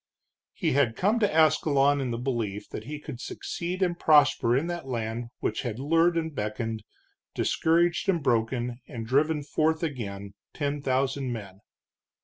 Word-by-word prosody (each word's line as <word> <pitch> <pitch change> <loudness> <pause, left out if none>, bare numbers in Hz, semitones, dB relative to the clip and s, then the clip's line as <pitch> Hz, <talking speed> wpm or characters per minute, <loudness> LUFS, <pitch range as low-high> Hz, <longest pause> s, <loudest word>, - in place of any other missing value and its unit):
He - - -1
had 130 -4 +2
come 210 - +2
to 205 -3 +2
Ascalon 145 -3 +3
in 130 - -2
the 115 - -2
belief 115 -5 -3
that 110 - -7
he 150 +3 -5
could 140 -5 -8
succeed 180 +2 -3
and 175 -1 -1
prosper 145 -5 +4
in 145 - 0
that 175 -4 -4
land 115 -1 -3
which - - -1
had 120 -4 -4
lured 165 +5 +2
and 160 -1 -2
beckoned, 110 -1 -3 0.5
discouraged 170 +2 +2
and 170 -6 +1
broken 120 0 0
and 115 -2 -6
driven 145 +5 +1
forth 160 +3 0
again 100 -10 -4 0.2
ten 145 -1 -2
thousand 135 0 0
men. 100 -4 -7
135 Hz, 155 wpm, -27 LUFS, 115-160 Hz, 0.5 s, prosper